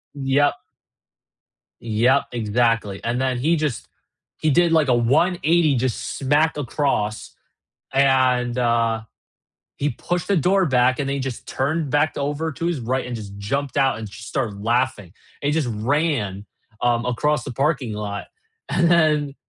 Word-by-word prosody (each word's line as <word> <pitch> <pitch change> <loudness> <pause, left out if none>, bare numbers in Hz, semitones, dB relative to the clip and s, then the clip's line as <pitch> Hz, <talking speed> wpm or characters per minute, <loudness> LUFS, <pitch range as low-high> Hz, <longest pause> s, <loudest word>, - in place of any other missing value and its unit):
yep. 140 +1 +2 1.3
Yep, 115 +5 +2
exactly, 115 -3 0
and 120 +2 -1
then 130 -1 0
he 160 +7 +2
just 150 -6 -3 0.5
he 155 - +1
did, 170 +3 +3
like, 160 -3 +3
a 125 - +4
180 155 +4 +2
just 125 -1 -2
smack 145 +4 +2
across, 125 -6 -2 0.6
and, 130 -3 +2
uh, 115 -2 +1 0.7
he 145 - 0
pushed 175 +8 -3
the 200 - +2
door 185 +4 +3
back, 130 -1 +3
and 140 - -2
then 140 - -1
he 140 - -2
just 130 -3 -5
turned 145 +2 -1
back 145 +2 +2
over 145 +3 -2
to 165 - -4
his 170 -3 -1
right 130 +3 -1
and 125 -1 -4
just 100 -2 -8
jumped 140 +7 -3
out 135 -5 +2
and 110 - -6
just 105 +2 -10
started 105 -7 -3
laughing, 120 -5 0 0.3
and - - -2
he - - +3
just 155 -3 0
ran, 115 - -1 0.4
um, 120 -1 +1
across 140 +3 0
the - - -5
parking 135 -3 -1
lot. 105 -1 -5 0.4
And 170 -1 +2
then 150 -4 +3
130 Hz, 155 wpm, -22 LUFS, 115-150 Hz, 1.3 s, a